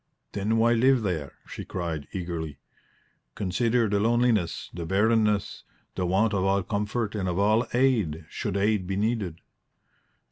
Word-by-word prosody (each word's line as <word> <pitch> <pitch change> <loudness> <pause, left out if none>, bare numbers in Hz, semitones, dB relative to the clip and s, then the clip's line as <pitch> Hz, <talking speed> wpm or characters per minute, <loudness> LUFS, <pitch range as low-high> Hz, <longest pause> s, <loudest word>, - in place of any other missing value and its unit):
"Then 105 +3 0
why 115 +1 +4
live 125 +1 +3
there?" 80 -8 -2
she - - -7
cried, 85 -5 -4
eagerly. 85 -5 -4 0.8
"Consider 115 +4 +1
the 100 0 +1
loneliness, 115 -5 +1
the 85 - -5
barrenness, 105 +1 +1 0.3
the 90 - -2
want 100 +5 +2
of 95 -2 +1
all 95 0 +2
comfort 105 +2 -2
and 95 -4 -2
of 90 - -2
all 110 +4 +3
aid, 110 - +1
should 100 - -3
aid 100 -2 +1
be 95 - -2
needed." 100 -5 -1
100 Hz, 145 wpm, -26 LUFS, 90-115 Hz, 0.8 s, why